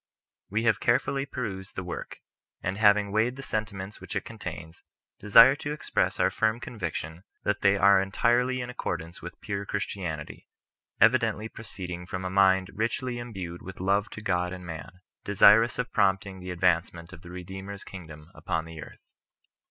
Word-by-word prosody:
We 110 +4 0
have 110 -2 +3
carefully 135 +3 +1
perused 95 -8 -5
the 95 - -3
Work; 90 -1 -7 0.4
and 95 +1 -1
having 105 -1 +5
weighed 110 +4 +1
the 135 - -8
sentiments 105 -4 -4
which - - -7
it - - -2
contains, 80 +1 -8 0.4
desire 115 +6 +8
to 145 -1 -4
express 150 - -1
our - - +3
firm 110 +1 +1
conviction 90 -7 -5 0.2
that 105 -1 0
they 100 -1 +5
^ire 100 -1 +5
entirely 120 +6 +1
in 120 0 -5
accordance 85 -7 -5
with 85 - -9
pure 100 -2 -3
Christianity, 90 -6 -4 0.5
evidently 110 +1 +3
proceedirg 90 -6 -7
from 90 0 -4
a 90 - -2
mind 95 -1 +4
richly 120 +3 -2
embued 95 -8 -6
with 95 0 -9
love 100 +3 +1
to 110 - -8
God 90 -3 0
and 90 -1 -8
man, 90 +2 -8 0.2
desirous 105 +5 +6
of 125 0 -3
promoting 95 0 +1
the 90 0 -8
advancement 85 -1 0
of 85 - -11
the 90 - -12
Redeemer's 95 +2 -7
kingdom 80 -3 -11
upon 80 -3 -3
the 80 -1 -9
earth. - - -12
95 Hz, 165 wpm, -27 LUFS, 90-110 Hz, 0.5 s, desire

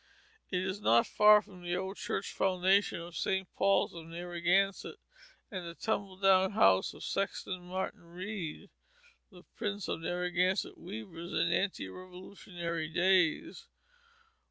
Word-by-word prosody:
It 180 0 0
is 190 +2 -3
not 115 - +5
far 210 0 +6
from 185 -3 -14
the 175 0 -2
old 190 +2 -3
Church 200 - -3
Foundation 190 +1 +2
of 170 0 -9
St. 190 +3 -1
Paul's 195 0 +2
of 165 -1 -9
Narragansett, 175 +3 0 0.6
and 185 -3 -4
the 170 0 -7
tumble 200 -3 -2
down 190 0 +4
house 95 - +4
of - - -10
Sexton 195 -1 -2
Martin 185 -1 -4
Read, 180 -1 -6 0.6
the 180 -4 -15
prince 205 -3 -3
of - - -2
Narragansett 180 +2 0
weavers 180 -3 -8
in - - +1
ante 190 - 0
Revolutionary 180 - -6
days. 185 - +2
185 Hz, 130 wpm, -32 LUFS, 175-195 Hz, 0.6 s, far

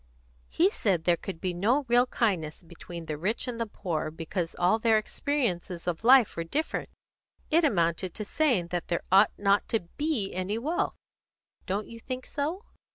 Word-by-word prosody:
"He 365 +5 +3
said 190 - +1
there 175 0 +4
could 175 0 -7
be 185 0 -2
no 235 +11 +1
real 245 +1 +4
kindness 180 -11 -1
between 170 0 -9
the 150 -2 -4
rich 210 +10 -1
and 235 -2 -4
poor, 160 -3 -2
because 165 +2 -4
all 180 +6 +3
their 225 -1 +4
experiences 215 -8 -2
of 175 +3 -2
life 250 -1 +6
were 165 - -2
different. 295 - -2 0.6
It 330 +2 +4
amounted 175 - +1
to 210 - -5
saying 225 - +1
that 175 -1 -3
there 170 - -1
ought 195 +2 +7
not 200 0 +2
to 225 - +1 0.2
be 290 -10 -1
any 185 +4 -2
wealth. 305 +9 -1 0.7
Don't 200 +2 -1
you 230 - -11
think 255 +2 -6
so?" 320 +9 -3
200 Hz, 170 wpm, -28 LUFS, 175-250 Hz, 0.7 s, ought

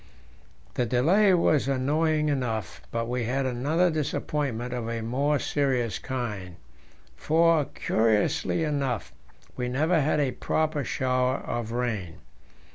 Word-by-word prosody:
The 120 - 0
delay 180 - +4
was 155 -5 +2
annoying 150 +3 +1
enough, 115 - -2
but 115 0 -2
we 125 -1 -1
had 135 +3 0
another 145 +8 +1
disappointment 140 -5 -2
of 120 -2 -3
a 115 -1 -3
more 140 +6 +1
serious 125 -8 0
kind, 105 -9 -4 0.6
for, 165 -1 +3
curiously 110 +8 +1
enough, 140 -5 -2 0.4
we 125 -1 -2
never 155 +6 +2
had 150 +1 +1
a 140 -3 +1
proper 155 0 -1
shower 130 0 0
of 115 -2 -4
rain. 115 -9 -2
130 Hz, 120 wpm, -26 LUFS, 120-150 Hz, 0.6 s, delay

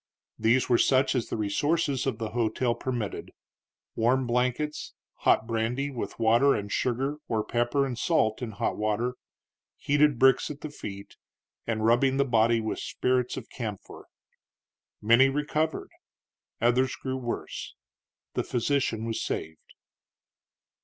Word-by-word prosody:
These 115 +4 +3
were 120 -2 +3
such 130 0 +3
as 125 -4 -1
the - - -2
resources 140 +6 0
of 125 -5 -1
the 110 -2 -4
hotel 120 +1 0
permitted, 120 -3 -4 0.7
warm 125 +3 +2
blankets, 125 +5 -1 0.2
hot 110 - +3
brandy, 120 +5 -1
with 125 - -5
water 120 +5 +4
and 100 0 -4
sugar, 135 +4 -1
or 110 -2 0
pepper 120 +5 +1
and 130 -2 -3
salt 115 -5 +1
in 115 -3 -4
hot 100 - -2
water, 110 +4 0 0.6
heated 145 -1 +2
bricks 130 +1 +4
at 150 -1 -8
the 155 - -6
feet, 100 -8 -9 0.5
and 110 -1 -1
rubbing 130 +4 +3
the 140 - +3
body 115 -2 +3
with 110 -1 -3
spirits 125 -1 -1
of - - -7
camphor. 110 -6 -7 1.0
Many 120 +5 +6
recovered, 150 +3 -1 0.7
others 125 +2 +2
grew 130 -1 -4
worse; 120 -2 -5 0.6
the - - -1
physician 120 -3 0
was 115 -1 -2
saved. 80 0 -5
120 Hz, 135 wpm, -27 LUFS, 115-135 Hz, 1.0 s, Many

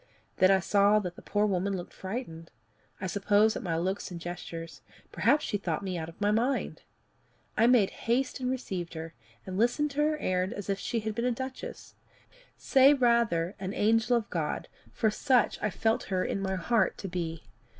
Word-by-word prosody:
Then 185 - +5
I 195 0 +5
saw 200 +3 +4
that 180 -4 -2
the - - -12
poor 205 0 +1
woman 195 0 0
looked 175 - -8
frightened 185 -5 -6 0.5
I 190 - -4
suppose 205 +3 +3
at - - -4
my 165 -4 -2
looks 185 +4 -2
and 175 -2 -7
gestures 165 -3 -7 0.3
perhaps 285 +7 +2
she 205 - -2
thought 170 -2 -2
me 190 -2 -3
out 160 -1 -4
of 165 - -15
my 205 0 +2
mind. 240 +6 0 0.7
I 225 - +4
made 240 -6 +4
haste 255 +4 -1
and 250 -1 -1
received 190 -10 -4
her, 160 0 -6 0.3
and 190 0 -4
listened 265 +6 +2
to 285 +2 -1
her 305 +1 +2
errand 185 -7 -1
as 205 0 -4
if 195 - -2
she 230 +2 -2
had 220 0 -3
been 235 +3 -2
a 250 - +2
duchess 260 +2 -6 0.6
say 270 +1 +5
rather 235 -9 +2
an 190 +1 -4
angel 225 +3 +3
of 225 - -3
God, 160 -4 -2 0.2
for 220 - +1
such 250 +1 +2
I 215 - +1
felt 220 +3 0
her 185 -1 -1
in 195 - -2
my 190 -1 -1
heart 225 +5 +1
to 195 - -6
be. 165 -3 -4
205 Hz, 195 wpm, -29 LUFS, 180-235 Hz, 0.7 s, Then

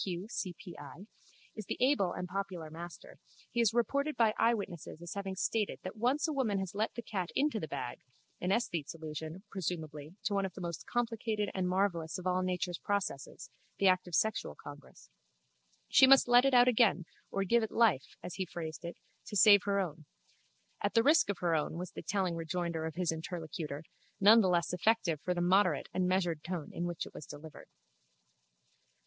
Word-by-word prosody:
K. 185 - -2
Q. 175 +4 -6
C. 185 -6 -4
P. 175 - -10
I.) 145 +7 -10 0.5
is 215 - -7
the - - -3
able 250 -9 +3
and 180 0 -4
popular 180 -4 -4
master, 175 - -10 0.3
he 235 - +1
is 225 -2 +4
reported 280 +6 0
by 225 -2 +4
eyewitnesses 200 -9 -1
as 175 0 -7
having 195 -1 -4
stated 210 +2 -1
that 185 - -6
once 255 +8 +1
a 310 - -2
woman 240 -8 0
has 190 -2 -3
let 215 +2 -1
the 235 - -5
cat 185 -5 -3
into 285 -5 +1
the 160 - -4
bag 125 -3 -5 0.4
(an 180 - -1
esthete's 175 -9 -1
allusion, 160 +3 -7
presumably, 160 -4 -5
to 205 - -1
one 200 -1 +1
of 190 -2 -4
the - - -8
most 170 -3 -5
complicated 225 -3 -1
and 185 -1 -1
marvellous 180 -4 0
of 185 - -8
all 185 0 +1
nature's 180 -1 -2
processes—the 195 0 -3
act 185 -1 +3
of 175 - -3
sexual 220 +7 0
congress) 145 - -13 0.8
she 265 - +7
must 270 -1 +7
let 245 +1 +6
it 275 - +3
out 245 0 +7
again 220 -7 +3 0.2
or 195 - -1
give 235 +5 +3
it 220 - -2
life, 220 - +2
as 180 - -6
he 190 +2 -2
phrased 160 -2 -6
it, 170 0 -6 0.3
to 210 - -6
save 205 0 +8
her 200 -1 +1
own. 160 -5 -4 0.8
At - - -1
the 230 - +5
risk 300 -4 +5
of 200 - -1
her 170 -2 +2
own, 155 0 0
was 180 0 -5
the - - -7
telling 185 +1 -1
rejoinder 165 0 -2
of 160 - -7
his 180 -2 0
interlocutor, 160 -2 -5 0.4
none 215 +4 +8
the 190 - +2
less 170 -1 +1
effective 180 -4 +1
for 180 - -1
the 175 - -1
moderate 180 -3 +3
and 185 -1 +1
measured 175 -4 0
tone 175 -3 -5
in 175 - -3
which 175 -2 -3
it - - -12
was 150 - -9
delivered. 155 0 -11
185 Hz, 200 wpm, -32 LUFS, 170-215 Hz, 0.8 s, save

